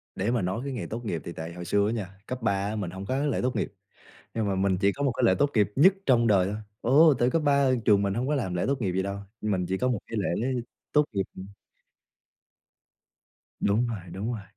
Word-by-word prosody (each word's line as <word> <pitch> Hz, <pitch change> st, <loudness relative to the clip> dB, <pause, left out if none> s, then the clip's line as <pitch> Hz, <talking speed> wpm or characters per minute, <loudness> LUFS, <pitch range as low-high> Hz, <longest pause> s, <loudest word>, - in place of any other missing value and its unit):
Để 100 Hz, +4 st, -1 dB
mà 120 Hz, -3 st, +1 dB
nói 95 Hz, +5 st, -1 dB
cái 140 Hz, -, -3 dB
ngày 120 Hz, -, -4 dB
tốt 115 Hz, +2 st, -6 dB
nghiệp 85 Hz, -8 st, -3 dB
thì 85 Hz, -, -6 dB
tại 80 Hz, +1 st, -6 dB
hồi 90 Hz, 0 st, -7 dB
xưa 100 Hz, +4 st, +2 dB
á 110 Hz, -, 0 dB
nha, 95 Hz, -4 st, -5 dB
cấp 125 Hz, -1 st, -5 dB
3 110 Hz, -, +2 dB, 0.2 s
á 110 Hz, -, -3 dB
mình 95 Hz, -5 st, -3 dB
hông 95 Hz, +2 st, -7 dB
có 130 Hz, -, -1 dB
cái 145 Hz, -, 0 dB
lễ -, -, 0 dB
tốt 125 Hz, 0 st, 0 dB
nghiệp, -, -, -2 dB, 0.6 s
nhưng 110 Hz, -2 st, 0 dB
mà 100 Hz, -, 0 dB
mình 95 Hz, -1 st, +1 dB
chỉ 100 Hz, 0 st, +3 dB
có 140 Hz, -, -5 dB
một 140 Hz, -3 st, +2 dB
cái -, -, -1 dB
lễ 95 Hz, -, +5 dB
tốt 145 Hz, 0 st, +3 dB
nghiệp 105 Hz, -2 st, +2 dB
nhất 185 Hz, +8 st, +6 dB
trong 120 Hz, -3 st, +4 dB
đời 100 Hz, -4 st, +4 dB
thôi. 100 Hz, +2 st, -3 dB, 0.2 s
Ồ, 150 Hz, +5 st, +6 dB
tại 120 Hz, +1 st, +3 dB
cấp 165 Hz, -, +1 dB
3 140 Hz, -2 st, +4 dB
trường 100 Hz, -2 st, +5 dB
mình 100 Hz, -1 st, 0 dB
hông 125 Hz, +5 st, -1 dB
có 150 Hz, -, +1 dB
làm 110 Hz, -10 st, -2 dB
lễ 90 Hz, -, 0 dB
tốt 135 Hz, -1 st, 0 dB
nghiệp 95 Hz, -4 st, 0 dB
gì 95 Hz, +1 st, 0 dB
đâu, 100 Hz, +1 st, -4 dB, 0.2 s
mình 95 Hz, -4 st, -1 dB
chỉ 95 Hz, 0 st, -1 dB
có 125 Hz, -, +1 dB
một 125 Hz, -4 st, 0 dB
cái 115 Hz, -, -5 dB
lễ 100 Hz, -, -1 dB, 0.6 s
tốt 150 Hz, 0 st, +5 dB
nghiệp, 100 Hz, -2 st, +1 dB
ừm. 95 Hz, -, -7 dB, 2.1 s
Đúng 110 Hz, +5 st, +2 dB
rồi, 115 Hz, -3 st, -3 dB
đúng 100 Hz, +6 st, -3 dB
rồi, 105 Hz, -, -6 dB
105 Hz, 265 wpm, -27 LUFS, 95-125 Hz, 2.1 s, nhất